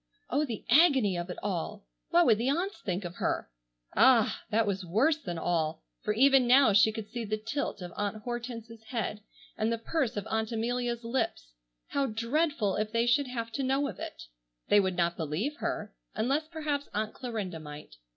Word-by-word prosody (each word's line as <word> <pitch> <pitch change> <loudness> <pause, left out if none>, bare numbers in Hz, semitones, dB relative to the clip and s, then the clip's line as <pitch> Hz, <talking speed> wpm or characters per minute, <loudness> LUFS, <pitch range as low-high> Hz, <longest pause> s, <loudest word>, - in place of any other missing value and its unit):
Oh, 300 +2 +2
the 230 -6 -6
agony 265 - +5
of 175 +1 -4
it 180 - -5
all! 180 - -3 0.2
What 175 - +5
would 220 -3 +4
the 245 +3 +1
aunts 355 +8 -1
think 185 0 -2
of 175 0 -7
her! - - -1 0.4
Ah! 235 -1 +5
that 220 +1 +2
was 195 -2 -1
worse 230 - +2
than 180 - -5
all, 160 -2 -1 0.2
for 210 - -1
even 270 +1 +5
now 255 -3 +6
she 205 +2 +6
could 220 -1 -7
see 240 0 -3
the 215 0 -2
tilt 225 -2 -3
of 175 -1 -7
Aunt 205 +1 -3
Hortense's 235 -2 -6
head, 220 -2 -3 0.3
and 220 +1 0
the 230 - 0
purse 240 0 -1
of 205 - -2
Aunt 220 0 -1
Amelia's 240 +1 -1
lips. 230 - -2 0.4
How 280 -1 +1
dreadful 230 - 0
if 215 0 -1
they 230 +1 +2
should 260 +3 +3
have 230 -2 -4
to 275 - -3
know 270 +2 +1
of - - -7
it. - - -7 0.5
They 205 - +7
would 190 -2 +1
not 170 0 +1
believe 175 - -2
her, - - -3 0.2
unless 280 +7 0
perhaps 305 -3 -3
Aunt 215 +1 -1
Clarinda 215 -9 -4
might. 150 - -10
225 Hz, 190 wpm, -30 LUFS, 200-260 Hz, 0.5 s, They